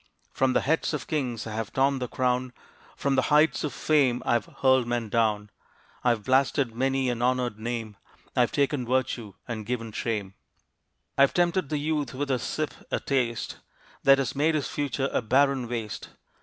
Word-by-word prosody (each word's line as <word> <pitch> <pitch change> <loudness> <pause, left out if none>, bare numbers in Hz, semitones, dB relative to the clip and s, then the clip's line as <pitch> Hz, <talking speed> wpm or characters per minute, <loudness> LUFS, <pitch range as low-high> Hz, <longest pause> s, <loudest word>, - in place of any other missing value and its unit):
From 130 -1 +2
the - - +3
heads 160 +1 +1
of 140 - -5
kings 125 -7 -2
I 110 - -6
have 110 -1 -3
torn 135 0 +2
the 125 - -2
crown; 125 0 0 0.4
From 140 0 0
the 130 - +3
heights 150 +2 +4
of 150 - -1
fame 135 -5 +2
I - - +2
have 120 -3 +1 0.2
hurled 130 -2 +4
men 120 -2 -1
down. 105 -2 +1 0.5
I 125 - +4
have 115 -3 +1
blasted 130 -1 +2
many 135 +2 0
an 120 -1 -4
honored 125 -3 0
name; 115 -2 -4 0.4
I - - +1
have 120 - +3
taken 140 -2 +1
virtue 120 -5 -1
and 115 -3 -4
given 115 0 -3
shame; 105 -3 -3 0.9
I - - +7
have 140 - +5
tempted 175 -3 +2
the 150 - 0
youth 150 -2 -1
with 140 +1 -2
a 130 - +1
sip, 155 +4 -3 0.2
a - - 0
taste, 125 -4 -1 0.4
That 135 0 +6
has 135 -2 -1
made 155 +3 +2
his 150 - -1
future 140 -2 -1
a - - +2
barren 130 +2 +2
waste. 115 -4 -4
130 Hz, 190 wpm, -27 LUFS, 115-140 Hz, 0.9 s, I